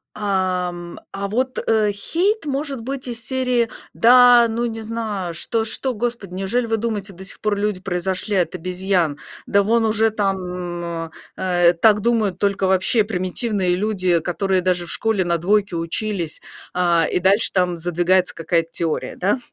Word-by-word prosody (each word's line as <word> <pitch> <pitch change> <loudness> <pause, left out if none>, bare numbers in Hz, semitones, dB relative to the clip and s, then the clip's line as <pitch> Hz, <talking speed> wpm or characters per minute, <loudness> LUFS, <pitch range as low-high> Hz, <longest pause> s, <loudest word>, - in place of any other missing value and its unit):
А, 185 -3 0
м, 175 -1 -8
а 200 0 -4
вот 255 +5 -1 0.3
хейт 350 - -1
может 275 -3 -3
быть 265 +1 -5
из 235 -1 -4
серии: 250 -3 +1 0.3
"Да, 245 0 +7
ну, 230 +1 -2
не 225 -1 -4
знаю, 215 -5 -4
что 220 +7 -2
что, 255 +3 -2
господи, 230 -4 -3
неужели 195 +6 -1
вы 225 - 0
думаете, 210 -3 -3
до 185 +2 -11
сих 190 - -6
пор 210 -1 0
люди 205 -2 -1
произошли 190 +2 -2
от 180 -3 +1
обезьян? 180 -3 -1 0.3
Да 200 0 +3
вон 225 +2 +2
уже 220 0 +3
там, 180 -4 -3 0.3
э, 175 -2 +3
так 210 -2 +5
думают 215 -5 +1
только 200 -1 0
вообще 190 +4 +3
примитивные 185 -1 -1
люди, 185 -3 +1
которые 185 +3 0
даже 180 -1 0
в - - -5
школе 220 -5 0
на 170 -1 +1
двойки 200 +2 +1
учились". 170 0 -3 0.3
А, 170 -2 +3
и - - +1
дальше 195 +4 +3
там 180 -2 +1
задвигается 175 +2 +1
какая-то 165 0 0
теория, 165 -2 -2
да? 200 +8 0
195 Hz, 160 wpm, -21 LUFS, 180-225 Hz, 0.3 s, Да